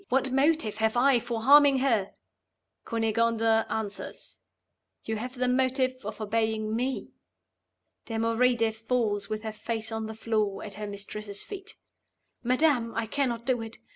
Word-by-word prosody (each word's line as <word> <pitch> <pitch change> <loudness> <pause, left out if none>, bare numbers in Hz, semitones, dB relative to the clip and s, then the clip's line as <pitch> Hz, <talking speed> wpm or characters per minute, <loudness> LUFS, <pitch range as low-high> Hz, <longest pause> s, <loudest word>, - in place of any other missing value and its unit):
What 265 0 +1
motive 270 -5 +2
have 220 +1 +1
I 260 0 +5
for 230 -1 -4
harming 285 +1 +7
her?' 230 -7 +1 0.7
Cunegonda 225 0 +2
answers, 210 -2 -4 0.6
'You 220 0 -2
have 250 +4 -5
the 250 0 0
motive 260 0 +2
of - - -6
obeying 220 0 0
Me.' 255 +3 -2 1.0
(Damoride 230 0 +2
falls 220 -2 -1
with 215 0 -3
her 220 -1 -4
face 220 +1 -4
on 220 -1 -3
the 220 - -7
floor 215 -3 -1
at 205 - -7
her 210 +1 -6
mistress's 205 0 -6
feet.) 395 0 -9 0.7
'Madam, 250 -2 +2
I 230 - 0
cannot 235 -1 -1
do 250 -3 +1
it! 225 0 -8
230 Hz, 140 wpm, -28 LUFS, 220-255 Hz, 1.0 s, harming